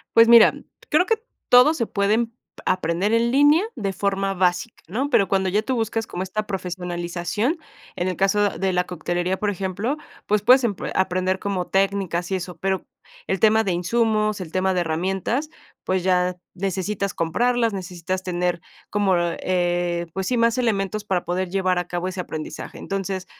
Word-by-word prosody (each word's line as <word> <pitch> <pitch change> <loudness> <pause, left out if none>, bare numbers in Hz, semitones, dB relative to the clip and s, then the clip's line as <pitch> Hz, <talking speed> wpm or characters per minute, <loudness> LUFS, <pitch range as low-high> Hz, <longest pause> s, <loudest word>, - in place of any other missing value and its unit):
Pues 230 0 +8
mira, 235 -1 +8 0.4
creo 315 +4 +4
que 450 +1 0 0.3
todos 270 +6 +6
se 230 - 0
pueden 215 +3 +1
p 230 - -29 0.3
aprender 185 +3 0
en 230 +1 +3
línea 290 +6 +5
de 195 -3 -2
forma 195 0 -1
básica, 185 +5 0
¿no?, 255 - -2
pero, 200 -7 +4
cuando 190 0 +1
ya 200 +3 +2
tú 260 +3 -2
buscas 225 -1 -1
como 180 - -4
esta 210 +3 -3
profesionalización, 180 - -2 0.4
en 175 - -1
el 185 - -1
caso 200 +2 +2
de 195 -1 -2
la 180 0 +1
coctelería, 175 +2 -2
por 210 +1 0
ejemplo, 200 - -2 0.3
pues, 210 0 +1
puedes 255 +5 +6
empre 210 -5 -2
aprender 185 0 +1
como 190 -2 -3
técnicas 195 -2 0
y - - +2
eso, 180 -1 -5
pero, 190 +1 -2 0.4
el 190 - 0
tema 220 +2 +4
de 195 - -1
insumos, 215 +3 +1
el 165 -4 -7
tema 185 +1 +1
de 180 - +1
herramientas, 190 - -1 0.4
pues 185 -1 0
ya, 180 -1 +2 0.2
necesitas 195 +1 -2
comprarlas, 230 +8 +1
necesitas 185 0 -4
tener 180 -1 -1 0.3
como, 205 -2 +2
eh, 175 0 0
pues 190 -1 -3
sí, 250 - +1
más 230 +1 +2
elementos 210 -3 -1
para 185 -4 0
poder 185 +1 -2
llevar 185 -1 +1
a 180 - -4
cabo 175 +1 -2
ese 185 0 -7
aprendizaje. 155 -3 -6
Entonces, 195 -1 -3
190 Hz, 175 wpm, -23 LUFS, 180-215 Hz, 0.4 s, Pues